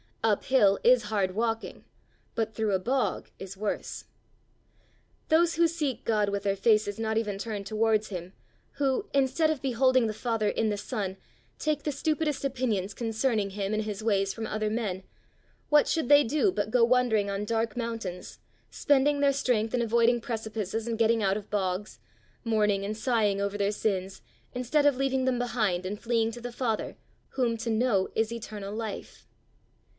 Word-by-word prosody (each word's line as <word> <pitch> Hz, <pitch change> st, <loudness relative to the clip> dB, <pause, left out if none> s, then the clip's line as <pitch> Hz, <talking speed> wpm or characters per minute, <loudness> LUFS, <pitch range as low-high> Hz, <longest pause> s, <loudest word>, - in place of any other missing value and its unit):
Up 215 Hz, -3 st, +1 dB
hill 205 Hz, -7 st, +4 dB
is 245 Hz, -3 st, +5 dB
hard 200 Hz, -3 st, -1 dB
walking, 225 Hz, 0 st, -2 dB, 0.5 s
but 220 Hz, -1 st, -1 dB
through 220 Hz, -2 st, 0 dB
a 190 Hz, -, +2 dB
bog 255 Hz, +7 st, -1 dB
is 195 Hz, 0 st, -8 dB
worse. 210 Hz, +1 st, -4 dB, 1.2 s
Those 335 Hz, +1 st, +4 dB
who 335 Hz, +1 st, +4 dB
seek 300 Hz, -7 st, -3 dB
God 210 Hz, -3 st, +2 dB
with 200 Hz, 0 st, -2 dB
their 200 Hz, -1 st, +1 dB
faces 210 Hz, 0 st, +2 dB
not 220 Hz, 0 st, -1 dB
even 210 Hz, -3 st, -1 dB
turned 205 Hz, -1 st, -5 dB
towards 215 Hz, 0 st, +1 dB
him, 180 Hz, -1 st, -6 dB, 0.4 s
who, 285 Hz, +9 st, -1 dB
instead 275 Hz, +3 st, +2 dB
of 310 Hz, -4 st, -1 dB
beholding 255 Hz, -1 st, +3 dB
the 215 Hz, -, -2 dB
Father 225 Hz, -2 st, -1 dB
in 225 Hz, -, 0 dB
the 205 Hz, -, -1 dB
Son, 200 Hz, -3 st, -4 dB, 0.4 s
take 305 Hz, -1 st, -1 dB
the 300 Hz, -, -1 dB
stupidest 300 Hz, 0 st, -1 dB
opinions 230 Hz, -7 st, -1 dB
concerning 225 Hz, -2 st, -1 dB
him 200 Hz, +1 st, -3 dB
and 215 Hz, 0 st, 0 dB
his 210 Hz, 0 st, -5 dB
ways 195 Hz, -3 st, +1 dB
from 225 Hz, +3 st, -5 dB
other 215 Hz, 0 st, -1 dB
men 210 Hz, -4 st, -2 dB, 0.7 s
what 295 Hz, -1 st, +5 dB
should 320 Hz, -7 st, 0 dB
they 290 Hz, 0 st, +8 dB
do 305 Hz, -, +2 dB
but 215 Hz, -, -2 dB
go 245 Hz, -1 st, +4 dB
wandering 230 Hz, -4 st, +3 dB
on 200 Hz, +1 st, -2 dB
dark 225 Hz, 0 st, -1 dB
mountains, 225 Hz, -7 st, -5 dB, 0.3 s
spending 285 Hz, +1 st, +2 dB
their 280 Hz, -1 st, +3 dB
strength 240 Hz, -5 st, 0 dB
in 245 Hz, -, +1 dB
avoiding 235 Hz, +1 st, +3 dB
precipices 220 Hz, -2 st, -4 dB
and 230 Hz, -1 st, -2 dB
getting 225 Hz, 0 st, +3 dB
out 195 Hz, 0 st, +2 dB
of 210 Hz, -1 st, -9 dB
bogs, 195 Hz, 0 st, -2 dB, 0.4 s
mourning 210 Hz, -4 st, +1 dB
and 215 Hz, +1 st, -4 dB
sighing 220 Hz, -4 st, +1 dB
over 200 Hz, 0 st, -2 dB
their 200 Hz, 0 st, +1 dB
sins 195 Hz, -3 st, -2 dB, 0.3 s
instead 255 Hz, +4 st, +1 dB
of 285 Hz, -3 st, +4 dB
leaving 265 Hz, -1 st, 0 dB
them 255 Hz, -1 st, +1 dB
behind 220 Hz, -7 st, 0 dB
and 205 Hz, +2 st, -4 dB
fleeing 230 Hz, -1 st, 0 dB
to 240 Hz, +1 st, -9 dB
the 245 Hz, +1 st, -5 dB
Father, 235 Hz, -3 st, -2 dB, 0.3 s
whom 245 Hz, -3 st, 0 dB
to 230 Hz, +1 st, -4 dB
know 220 Hz, -4 st, +2 dB
is 220 Hz, 0 st, +1 dB
eternal 210 Hz, -3 st, -6 dB
life. 220 Hz, -2 st, -6 dB
225 Hz, 175 wpm, -28 LUFS, 205-250 Hz, 1.2 s, they